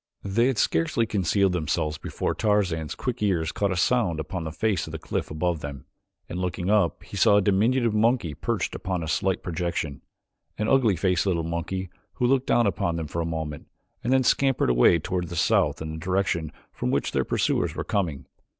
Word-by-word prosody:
They 110 Hz, +5 st, +2 dB
had 130 Hz, -4 st, 0 dB
scarcely 80 Hz, +6 st, +1 dB
concealed 100 Hz, -2 st, +1 dB
themselves 75 Hz, -2 st, -1 dB
before -, -, -2 dB
Tarzan's 95 Hz, -7 st, 0 dB
quick 125 Hz, -2 st, -4 dB
ears 85 Hz, -6 st, +1 dB
caught 100 Hz, -1 st, 0 dB
a -, -, 0 dB
sound 95 Hz, -5 st, +2 dB
upon 85 Hz, +3 st, -4 dB
the 80 Hz, -, -4 dB
face 100 Hz, +4 st, 0 dB
of -, -, -7 dB
the -, -, -3 dB
cliff -, -, -3 dB
above 80 Hz, +2 st, -1 dB
them, 70 Hz, -3 st, -7 dB, 0.4 s
and 90 Hz, -, -5 dB
looking 90 Hz, +1 st, -1 dB
up 100 Hz, -7 st, +2 dB
he -, -, -10 dB
saw 100 Hz, -, +5 dB
a -, -, +4 dB
diminutive 115 Hz, +4 st, +2 dB
monkey 110 Hz, -6 st, +2 dB
perched -, -, -2 dB
upon 90 Hz, -3 st, -3 dB
a -, -, -4 dB
slight 95 Hz, +4 st, 0 dB
projection 85 Hz, -4 st, -3 dB, 0.6 s
an 105 Hz, -, -1 dB
ugly 120 Hz, -7 st, +4 dB
faced 90 Hz, +1 st, +1 dB
little 85 Hz, -3 st, +1 dB
monkey 85 Hz, +3 st, -3 dB, 0.2 s
who 125 Hz, -, -1 dB
looked 135 Hz, +1 st, +2 dB
down 120 Hz, -, +3 dB
upon 95 Hz, -3 st, 0 dB
them 80 Hz, -1 st, -3 dB
for 85 Hz, +3 st, -3 dB
a 80 Hz, -, -2 dB
moment 80 Hz, -2 st, -5 dB, 0.4 s
and 120 Hz, -, 0 dB
then 130 Hz, 0 st, +4 dB
scampered 135 Hz, -, +2 dB
away -, -, +5 dB
toward 90 Hz, +2 st, -3 dB
the 85 Hz, -, -7 dB
south 80 Hz, -, +2 dB
in 80 Hz, -, -5 dB
the 80 Hz, -, -6 dB
direction 90 Hz, -3 st, -1 dB, 0.2 s
from -, -, -3 dB
which -, -, 0 dB
their -, -, +1 dB
pursuers -, -, 0 dB
were -, -, -3 dB
coming. 85 Hz, -9 st, -2 dB
90 Hz, 200 wpm, -25 LUFS, 80-105 Hz, 0.6 s, saw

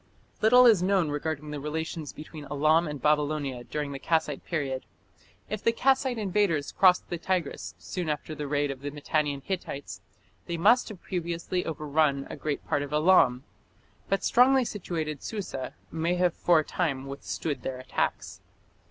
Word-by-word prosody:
Little 245 Hz, +3 st, +7 dB
is 220 Hz, -7 st, +6 dB
known 185 Hz, -3 st, +2 dB
regarding 150 Hz, 0 st, -3 dB
the 150 Hz, -, -4 dB
relations 155 Hz, 0 st, -4 dB
between 155 Hz, -1 st, -10 dB
Elam 155 Hz, +4 st, +3 dB
and 150 Hz, -1 st, -5 dB
Babylonia 145 Hz, -3 st, 0 dB
during 145 Hz, +3 st, -4 dB
the 135 Hz, -, -5 dB
Kassite 160 Hz, -2 st, 0 dB
period. 135 Hz, -6 st, -2 dB, 0.6 s
If 215 Hz, 0 st, -4 dB
the 230 Hz, -, +4 dB
Kassite 260 Hz, +1 st, +2 dB
invaders 195 Hz, -8 st, +1 dB
crossed 185 Hz, -2 st, +4 dB
the 175 Hz, -, -2 dB
Tigris 175 Hz, -4 st, -2 dB
soon 180 Hz, -4 st, -4 dB
after 150 Hz, +1 st, -3 dB
the 150 Hz, -1 st, -5 dB
raid 145 Hz, 0 st, 0 dB
of 135 Hz, -1 st, -8 dB
the 145 Hz, -, -3 dB
Mitannian 145 Hz, -1 st, -1 dB
Hittites 140 Hz, -, -5 dB, 0.5 s
they 170 Hz, -, -2 dB
must 225 Hz, +10 st, +4 dB
have 205 Hz, -5 st, -10 dB
previously 175 Hz, 0 st, -2 dB
overrun 150 Hz, -2 st, 0 dB
a -, -, -5 dB
great 150 Hz, -2 st, -3 dB
part -, -, 0 dB
of 145 Hz, 0 st, -5 dB
Elam, 150 Hz, -5 st, +4 dB, 0.7 s
but 195 Hz, -, +1 dB
strongly 255 Hz, +1 st, +5 dB
situated 160 Hz, -, -4 dB
Susa 190 Hz, -, -5 dB, 0.2 s
may 165 Hz, +2 st, 0 dB
have 180 Hz, -1 st, +2 dB
for 175 Hz, -1 st, +3 dB
a -, -, -7 dB
time 140 Hz, -6 st, -2 dB
withstood 140 Hz, +2 st, -4 dB
their 130 Hz, -, -4 dB
attacks. 130 Hz, -, -3 dB
155 Hz, 160 wpm, -28 LUFS, 145-180 Hz, 0.7 s, Little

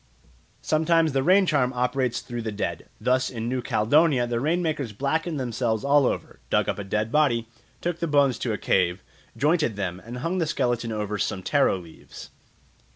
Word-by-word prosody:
Sometimes 160 Hz, 0 st, +2 dB
the 135 Hz, -, +2 dB
rain 185 Hz, +7 st, +5 dB
charm 140 Hz, -7 st, +2 dB
operates 125 Hz, 0 st, 0 dB
through 120 Hz, -1 st, -6 dB
the 110 Hz, -1 st, -3 dB
dead. 105 Hz, -, -4 dB
Thus 130 Hz, +1 st, +1 dB
in 115 Hz, -2 st, -5 dB
New 125 Hz, +1 st, -1 dB
Caledonia 130 Hz, +4 st, +3 dB
the 120 Hz, -1 st, -2 dB
rain 165 Hz, +7 st, 0 dB
makers 150 Hz, -8 st, -2 dB
blackened 150 Hz, -, -1 dB
themselves 115 Hz, -3 st, -1 dB
all 140 Hz, -1 st, +4 dB
over, -, -, -4 dB
dug -, -, +2 dB
up -, -, -2 dB
a -, -, -3 dB
dead 105 Hz, +3 st, -2 dB
body, 120 Hz, -6 st, +2 dB, 0.3 s
took 170 Hz, -1 st, -2 dB
the 170 Hz, -, -1 dB
bones 140 Hz, -5 st, +3 dB
to 120 Hz, -, -2 dB
a 105 Hz, -, -1 dB
cave, 90 Hz, -1 st, +1 dB, 0.3 s
jointed 150 Hz, -, +2 dB
them, 95 Hz, -2 st, -4 dB
and 120 Hz, +3 st, -7 dB
hung 170 Hz, +8 st, -2 dB
the 165 Hz, -, 0 dB
skeleton 120 Hz, -5 st, -1 dB
over 105 Hz, -1 st, -3 dB
some 95 Hz, -1 st, -2 dB
taro 140 Hz, -6 st, +2 dB
leaves. 85 Hz, -3 st, -12 dB
125 Hz, 185 wpm, -25 LUFS, 110-150 Hz, 0.3 s, rain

